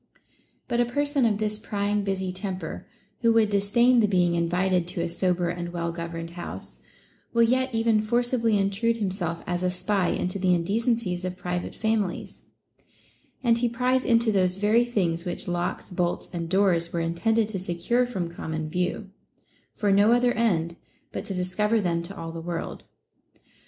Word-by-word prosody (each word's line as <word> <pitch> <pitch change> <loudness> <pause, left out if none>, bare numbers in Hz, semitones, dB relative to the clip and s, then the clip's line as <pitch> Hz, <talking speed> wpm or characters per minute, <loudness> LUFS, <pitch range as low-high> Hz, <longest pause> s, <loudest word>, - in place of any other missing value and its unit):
But 240 -1 0
a 240 - +4
person 285 +1 +1
of 210 -2 +1
this 215 0 -1
prying 205 -1 -1
busy 190 -1 -2
temper, 190 0 -5 0.3
who 230 -1 +3
would 220 -2 +3
disdain 235 +5 +4
the 215 - +4
being 180 -3 +2
invited 175 +1 +1
to 175 - -3
a 170 - 0
sober 180 0 0
and 175 0 -4
well 170 -1 -2
governed 170 0 -6
house, 175 0 -8 0.5
will 235 0 +5
yet 260 +3 +2
even 225 -1 +3
forcibly 235 0 +1
intrude 200 +4 +1
himself 185 -5 -2
as 175 0 -2
a 180 - +1
spy 185 +1 0
into 185 +2 -2
the 180 -1 +3
indecencies 200 0 0
of 185 0 -4
private 180 -1 -4
families; 220 -4 -2 1.0
and 235 -1 +3
he 240 0 +1
pries 255 +2 +1
into 230 -1 +3
those 185 -2 +2
very 215 +4 +3
things 175 -8 0
which 175 0 -4
locks, 175 +1 -2
bolts, 175 -1 -1
and 170 -1 -3
doors 180 -3 +2
were 170 - -1
intended 210 +7 +1
to 200 -3 -3
secure 185 +8 0
from 190 -8 -3
common 160 -2 -5
view, 180 +4 -2 0.6
for 205 -2 +1
no 205 +4 +5
other 245 0 +3
end 170 -8 0 0.3
but - - -5
to 195 -3 -4
discover 210 +5 +1
them 170 -4 0
to 195 +4 -8
all 165 0 -5
the 165 0 -6
world. 170 0 -5
195 Hz, 170 wpm, -26 LUFS, 175-225 Hz, 1.0 s, will